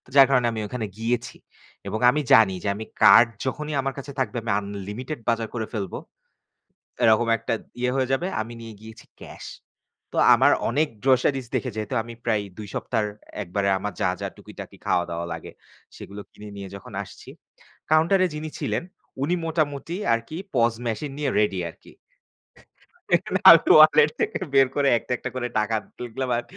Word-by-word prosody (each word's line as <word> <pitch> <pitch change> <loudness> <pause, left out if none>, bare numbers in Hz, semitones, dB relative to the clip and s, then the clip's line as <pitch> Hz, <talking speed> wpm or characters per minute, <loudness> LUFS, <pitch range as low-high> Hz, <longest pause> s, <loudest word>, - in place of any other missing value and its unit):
যার 135 -1 +8
কারণে 125 -3 +3
আমি 110 -1 -4
ওখানে 115 +1 -4
গিয়েছি 115 +1 -2 0.5
এবং 110 - -3
আমি 150 +4 +1
জানি 105 -4 +6
যে - - -3
আমি 110 +2 -6 0.2
card 120 - +8 0.2
যখনই 150 +3 -3
আমার 135 0 -3
কাছে 140 +1 -7
থাকবে 125 -3 -1
আমি 115 -2 -3
unlimited 105 +8 -6
বাজার 115 -1 0
করে 110 -3 -3
ফেলব। 100 -5 -4 1.1
এরকম 115 +1 +4
একটা 115 - -4 0.3
ইয়ে 125 0 +1
হয়ে 130 -1 0
যাবে 150 +7 0
আমি 110 +2 -5
নিয়ে 115 -1 -9
গিয়েছি 110 +2 -13 0.2
cash. - - -10 0.6
তো - - -7 0.2
আমার - - +4 0.2
অনেক 150 +6 +1 0.2
groceries 135 0 +2
দেখে 125 - -1
যেহেতু 110 +3 -4
আমি 115 +1 -10
প্রায় 110 -3 +1 0.2
২ 105 -1 -7
সপ্তাহর 110 -3 -1 0.3
একবারে 100 +2 -2
আমার 105 +2 -4
যা, - - +2
যা - - -3
টুকিটাকি - - -11
খাওয়া 90 - +2
দাওয়া 85 0 -4
লাগে 80 -1 -7 0.5
সেগুলো 100 +1 -9
কিনে 105 - -11
নিয়ে 100 -1 -7
যখন 100 - -12
আসছি। - - -13 0.6
Counter 160 +5 +4
এ - - -3
যিনি 155 +1 -5
ছিলেন - - -2 0.4
উনি 160 +6 +1
মোটামুটি 155 -1 -2 0.2
আরকি 115 +7 -5 0.2
POS 115 -2 +2
machine 135 +5 -3
নিয়ে 150 - 0
ready 105 -3 +1
আরকি। - - -19 1.6
আমি - - +10 0.2
wallet 465 0 +7
থেকে 440 -1 0 0.2
বের 135 -1 +6
করে 140 -1 +3
একটা, - - -11
একটা - - -5
করে 125 -1 -2
টাকা 110 +1 0 0.2
তুললাম 125 +2 -5
আর 120 - -3
120 Hz, 170 wpm, -24 LUFS, 110-135 Hz, 1.6 s, আমি